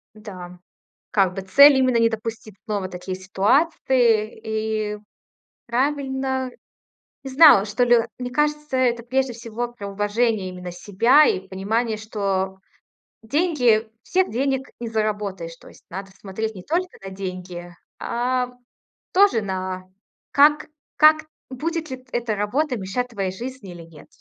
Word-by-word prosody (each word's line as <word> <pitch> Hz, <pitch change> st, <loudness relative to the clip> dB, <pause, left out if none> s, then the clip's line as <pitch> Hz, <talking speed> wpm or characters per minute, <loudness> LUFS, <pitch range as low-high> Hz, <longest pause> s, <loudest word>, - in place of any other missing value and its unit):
Да, 185 Hz, -4 st, -10 dB, 0.5 s
как 190 Hz, -3 st, +2 dB
бы, 195 Hz, -, -3 dB
цель- 280 Hz, +9 st, +7 dB
именно 255 Hz, -2 st, +3 dB
не 230 Hz, 0 st, +4 dB
допустить 220 Hz, -2 st, -6 dB
снова 205 Hz, -4 st, -3 dB
такие 180 Hz, +1 st, -6 dB
ситуации, 220 Hz, -, +2 dB, 0.5 s
и 210 Hz, -, -6 dB, 0.7 s
правильно. 265 Hz, 0 st, -1 dB, 0.7 s
Не 270 Hz, -, -6 dB
знала, 270 Hz, -8 st, +8 dB
что 215 Hz, +4 st, 0 dB
ли. 240 Hz, -1 st, +5 dB, 0.2 s
Мне 250 Hz, 0 st, -5 dB
кажется, 300 Hz, 0 st, 0 dB
это, 240 Hz, -2 st, +1 dB
прежде 260 Hz, +1 st, 0 dB
всего, 235 Hz, +1 st, -5 dB
про 200 Hz, -4 st, -7 dB
уважение 205 Hz, 0 st, 0 dB
именно 180 Hz, -1 st, -7 dB
себя, 230 Hz, +11 st, +4 dB
и 190 Hz, -7 st, 0 dB
понимание, 215 Hz, +4 st, -1 dB
что 195 Hz, -3 st, -2 dB, 0.7 s
деньги 245 Hz, -5 st, +2 dB
всех 375 Hz, +7 st, +1 dB
денег 265 Hz, +3 st, -1 dB
не 235 Hz, -, -4 dB
заработаешь. 205 Hz, -6 st, -3 dB
То -, -, -16 dB
есть -, -, -18 dB
надо 195 Hz, +1 st, -7 dB
смотреть 215 Hz, +3 st, -5 dB
не 185 Hz, -, -8 dB
только 360 Hz, +3 st, -2 dB
на 195 Hz, -, -6 dB
деньги, 180 Hz, -2 st, -7 dB, 0.3 s
а 250 Hz, +1 st, -1 dB, 0.6 s
тоже 385 Hz, -, +5 dB
на 185 Hz, -2 st, -4 dB, 0.5 s
как 295 Hz, +2 st, +4 dB, 0.3 s
как 310 Hz, +1 st, +5 dB, 0.2 s
будет 315 Hz, +4 st, -3 dB
ли 260 Hz, -, -4 dB
т 255 Hz, -, -22 dB
эта 235 Hz, -3 st, -1 dB
работа 250 Hz, +7 st, -1 dB
мешать 220 Hz, +6 st, -3 dB
твоей 195 Hz, -5 st, -3 dB
жизни 245 Hz, -2 st, -8 dB
или 170 Hz, -1 st, -10 dB
нет. 165 Hz, -2 st, -15 dB
225 Hz, 140 wpm, -22 LUFS, 195-260 Hz, 0.7 s, знала